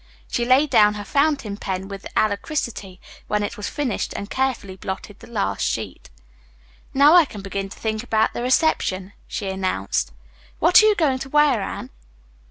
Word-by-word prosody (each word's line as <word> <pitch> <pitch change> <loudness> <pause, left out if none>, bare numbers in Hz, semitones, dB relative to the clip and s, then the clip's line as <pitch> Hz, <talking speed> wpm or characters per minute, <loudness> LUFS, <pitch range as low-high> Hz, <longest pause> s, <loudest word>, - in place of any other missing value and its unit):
She 240 - -1
laid 265 +4 +4
down 210 0 +5
her 205 - -5
fountain 275 -4 0
pen 190 -2 -4
with 195 0 -8
alacrity 205 - -2 0.3
when 210 0 0
it 205 - -4
was 210 -2 -5
finished 280 -7 -3
and 200 - -6
carefully 260 -8 -1
blotted 190 +2 -7
the - - -13
last 215 -4 -2
sheet. - - -3 0.8
"Now 285 +3 +6
I 350 -1 +8
can 210 -7 -9
begin 195 0 -4
to - - -11
think 220 -1 -2
about 220 -2 +1
the - - -4
reception," 240 - +1
she 200 - -4
announced. 185 - -1 0.5
"What 345 +6 +6
are 430 - +5
you 425 - +4
going 285 -8 +1
to 270 - -7
wear, 295 -6 +3
Anne?" - - -6
215 Hz, 175 wpm, -22 LUFS, 195-275 Hz, 0.8 s, I